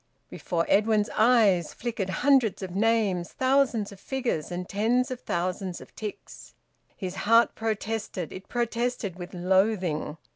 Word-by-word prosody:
Before 170 Hz, -2 st, -2 dB
Edwin's 215 Hz, +1 st, +2 dB
eyes 215 Hz, -7 st, +4 dB
flickered 225 Hz, -6 st, -3 dB
hundreds 250 Hz, -3 st, +2 dB
of 185 Hz, -1 st, -6 dB
names, 205 Hz, -5 st, +1 dB
thousands 260 Hz, -5 st, +2 dB
of 200 Hz, -, -12 dB
figures, 240 Hz, -, -2 dB
and 180 Hz, 0 st, -4 dB
tens 240 Hz, +5 st, +1 dB
of 255 Hz, -, -4 dB
thousands 180 Hz, -1 st, -3 dB
of -, -, -15 dB
ticks. 210 Hz, -2 st, -8 dB, 0.4 s
His 185 Hz, -3 st, -4 dB
heart 230 Hz, +2 st, +4 dB
protested; 220 Hz, -5 st, -3 dB
it 185 Hz, -, -10 dB
protested 235 Hz, -5 st, -2 dB
with 175 Hz, +1 st, -8 dB
loathing. 180 Hz, -4 st, +1 dB
210 Hz, 135 wpm, -27 LUFS, 185-235 Hz, 0.4 s, eyes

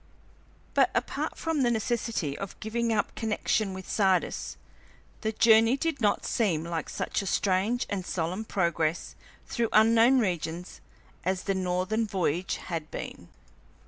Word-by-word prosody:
But -, -, +4 dB
apart -, -, -2 dB
from 325 Hz, -3 st, -1 dB
the 245 Hz, -, +3 dB
necessity 225 Hz, -, -1 dB
of 195 Hz, +3 st, -7 dB
giving 230 Hz, +2 st, -1 dB
up 215 Hz, -2 st, 0 dB
connection 215 Hz, -2 st, 0 dB
with 190 Hz, -1 st, -8 dB
Sardis, 190 Hz, -3 st, +1 dB, 0.6 s
the 220 Hz, -, 0 dB
journey 225 Hz, +3 st, +5 dB
did 320 Hz, -2 st, -2 dB
not 205 Hz, -2 st, +2 dB
seem 180 Hz, -9 st, +1 dB
like 170 Hz, -1 st, -4 dB
such -, -, -2 dB
a 195 Hz, -, -5 dB
strange 200 Hz, +6 st, +1 dB
and 195 Hz, -2 st, -3 dB
solemn 180 Hz, +4 st, -2 dB
progress 170 Hz, -5 st, 0 dB, 0.3 s
through 230 Hz, -2 st, -1 dB
unknown 230 Hz, +4 st, +6 dB
regions 175 Hz, -5 st, -2 dB, 0.4 s
as 185 Hz, +1 st, -1 dB
the 195 Hz, -, 0 dB
northern 185 Hz, +4 st, 0 dB
voyage 180 Hz, -2 st, -1 dB
had 165 Hz, -3 st, -5 dB
been. -, -, -7 dB
200 Hz, 140 wpm, -28 LUFS, 180-225 Hz, 0.6 s, unknown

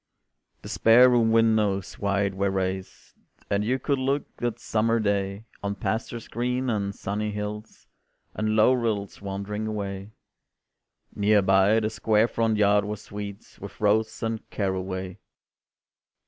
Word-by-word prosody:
The -, -, -8 dB
spare 120 Hz, +3 st, +6 dB
room 115 Hz, -2 st, +3 dB
windows 110 Hz, -4 st, +2 dB
wide 100 Hz, -1 st, 0 dB
were 100 Hz, +1 st, 0 dB
raised, 95 Hz, 0 st, -4 dB, 0.4 s
And 100 Hz, +1 st, +2 dB
you 125 Hz, +5 st, +1 dB
could 140 Hz, 0 st, -1 dB
look 135 Hz, +2 st, -2 dB
that 120 Hz, -2 st, -2 dB
summer 115 Hz, +1 st, +1 dB
day 100 Hz, 0 st, -1 dB, 0.2 s
On 100 Hz, 0 st, -2 dB
pastures 115 Hz, +3 st, -3 dB
green, 125 Hz, +1 st, -1 dB
and 100 Hz, -2 st, -2 dB
sunny 105 Hz, +2 st, -3 dB
hills, 105 Hz, +1 st, -6 dB, 0.5 s
And 110 Hz, 0 st, -1 dB
low 110 Hz, +4 st, +5 dB
rills 110 Hz, -6 st, -2 dB
wandering 100 Hz, +2 st, -4 dB
away. 100 Hz, -2 st, -4 dB, 1.1 s
Near 105 Hz, 0 st, +3 dB
by, 95 Hz, +3 st, +4 dB
the 110 Hz, 0 st, -1 dB
square 110 Hz, +1 st, +2 dB
front 115 Hz, -2 st, 0 dB
yard 105 Hz, 0 st, +4 dB
was 105 Hz, 0 st, -5 dB
sweet 100 Hz, +1 st, -8 dB
With 100 Hz, +5 st, -9 dB
rose 110 Hz, +1 st, +1 dB
and 115 Hz, -1 st, -2 dB
caraway. 95 Hz, -2 st, -3 dB
105 Hz, 135 wpm, -26 LUFS, 100-115 Hz, 1.1 s, spare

